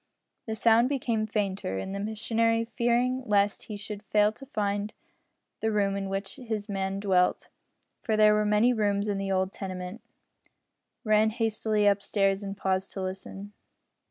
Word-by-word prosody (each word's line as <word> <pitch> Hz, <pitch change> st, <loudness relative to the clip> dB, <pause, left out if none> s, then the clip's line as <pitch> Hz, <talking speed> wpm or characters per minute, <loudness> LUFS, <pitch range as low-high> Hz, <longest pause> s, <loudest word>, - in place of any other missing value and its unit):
The 220 Hz, -, -2 dB
sound 230 Hz, +2 st, +4 dB
became 235 Hz, -6 st, -1 dB
fainter, 195 Hz, -, -2 dB
and 190 Hz, -, -4 dB
the 200 Hz, -, -3 dB
missionary, 225 Hz, +2 st, 0 dB
fearing 240 Hz, +3 st, +1 dB
lest 205 Hz, -1 st, +2 dB
he 210 Hz, -, -6 dB
should 205 Hz, 0 st, -6 dB
fail 210 Hz, +1 st, +3 dB
to 270 Hz, +5 st, -13 dB
find 205 Hz, -3 st, -2 dB, 0.6 s
the 220 Hz, -, 0 dB
room 200 Hz, -2 st, +1 dB
in 195 Hz, -1 st, -3 dB
which 195 Hz, 0 st, -4 dB
his 220 Hz, -4 st, -4 dB
man 195 Hz, -1 st, -2 dB
dwelt 185 Hz, -3 st, +1 dB, 0.5 s
for 220 Hz, -3 st, 0 dB
there 215 Hz, 0 st, +6 dB
were 210 Hz, 0 st, +2 dB
many 210 Hz, +4 st, +3 dB
rooms 205 Hz, -2 st, 0 dB
in 200 Hz, -1 st, -1 dB
the 195 Hz, 0 st, -2 dB
old 190 Hz, 0 st, 0 dB
tenement 185 Hz, +1 st, -6 dB, 1.0 s
ran 215 Hz, 0 st, +4 dB
hastily 220 Hz, -2 st, 0 dB
up 200 Hz, 0 st, +3 dB
stairs 195 Hz, -1 st, +1 dB
and 195 Hz, 0 st, -5 dB
paused 190 Hz, 0 st, -1 dB
to 195 Hz, -, -4 dB
listen. 195 Hz, +2 st, -6 dB
210 Hz, 160 wpm, -28 LUFS, 195-220 Hz, 1.0 s, there